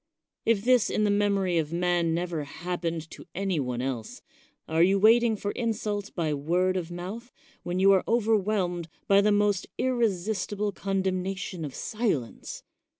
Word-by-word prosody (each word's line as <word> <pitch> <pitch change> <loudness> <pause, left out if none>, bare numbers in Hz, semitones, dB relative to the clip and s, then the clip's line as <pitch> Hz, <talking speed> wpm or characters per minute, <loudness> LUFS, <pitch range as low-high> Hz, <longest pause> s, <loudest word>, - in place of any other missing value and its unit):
If 220 -3 +3
this 250 -2 +4
in 215 - 0
the 205 - +3
memory 200 -4 +2
of 155 -1 -2
man 175 -1 +1
never 170 -3 -2
happened 165 +1 -4
to - - -11
any 190 -3 0
one 125 -2 -2
else, 125 -5 -5 0.4
are 160 +1 +1
you 190 +3 +5
waiting 225 +2 +5
for 205 0 -3
insults 210 -3 -2
by 160 -4 -1
word 175 +6 +1
of 175 -3 -2
mouth, 190 +8 -7 0.3
when 175 +1 -3
you 195 +1 +6
are 190 -1 +4
overwhelmed 205 -6 +1 0.2
by 200 0 +6
the 210 +1 +3
most 205 -2 +2
irresistible 210 -4 0
condemnation 190 -2 -2
of 145 -3 -6
silence? 205 - -3
190 Hz, 150 wpm, -27 LUFS, 170-210 Hz, 0.4 s, you